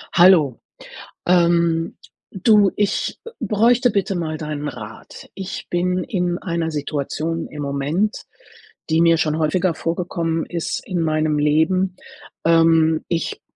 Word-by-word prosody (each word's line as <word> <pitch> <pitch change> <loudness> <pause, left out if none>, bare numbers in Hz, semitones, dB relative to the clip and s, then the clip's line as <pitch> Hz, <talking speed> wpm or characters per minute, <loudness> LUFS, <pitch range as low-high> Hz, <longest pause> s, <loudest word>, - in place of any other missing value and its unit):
Hallo. 170 -8 +5 0.7
Ähm 170 -2 +2 0.3
du, 205 0 +4
ich, 205 -1 -1
äh, 465 - -8
bräuchte 235 +3 +3
bitte 200 -1 -1
mal 160 -3 -3
deinen 150 -1 -4
Rat. 110 -3 -10
Ich 190 -1 -6
bin 180 +1 0
in 175 -4 -1
einer 170 -3 -2
Situation 155 +2 -3
im 150 - -8
Moment, 145 +9 -1 0.7
die 160 0 +2
mir 165 0 +5
schon 155 -1 0
häufiger 170 +3 +1
vorgekommen 165 -1 -2
ist 170 -2 -3
in 180 -3 -2
meinem 155 -1 +1
Leben. 160 +6 +1 0.5
Ähm, 165 -1 +4
ich 170 -2 -3
165 Hz, 125 wpm, -20 LUFS, 155-185 Hz, 0.7 s, Hallo